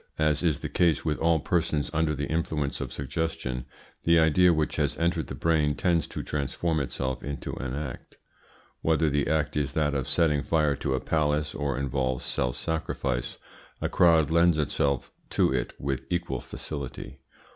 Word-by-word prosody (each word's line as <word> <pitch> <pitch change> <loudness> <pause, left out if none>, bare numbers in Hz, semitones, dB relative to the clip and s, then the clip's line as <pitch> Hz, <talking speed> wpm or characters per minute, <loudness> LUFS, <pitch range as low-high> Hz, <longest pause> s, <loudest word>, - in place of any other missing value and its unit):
As 75 -2 +2
is 80 -5 +1
the - - -2
case 85 -4 +2
with 75 -2 0
all 80 0 +3
persons 80 -3 0
under 75 -1 +1
the 70 +1 -2
influence 80 -2 -1
of - - -4
suggestion, 65 -3 -3 0.4
the 85 0 +5
idea 80 +3 +5
which 80 -2 0
has 75 -2 0
entered 85 +1 0
the - - -5
brain 75 -3 +2
tends 85 -3 +1
to - - -5
transform 75 +3 -1
itself 65 -1 -3
into 70 -1 -5
an 65 -1 -4
act. 70 -3 -6 0.6
Whether 80 -1 +2
the 70 0 +1
act 75 -1 0
is 70 -1 -1
that 75 -2 +1
of 70 -3 -1
setting 75 -4 +2
fire 75 -2 +2
to 70 -2 -1
a - - 0
palace, 75 0 0
or 70 -2 -2
involves 65 -2 -1
self 60 0 -1
sacrifice, 70 -6 -2 0.4
a - - -1
crowd 80 -3 +4
lends 85 0 +4
itself 70 -3 0 0.2
to - - +2
it 65 -2 -1
with 65 -1 -2
equal 85 -8 -1
facility. 70 -5 -7
75 Hz, 170 wpm, -27 LUFS, 70-80 Hz, 0.6 s, the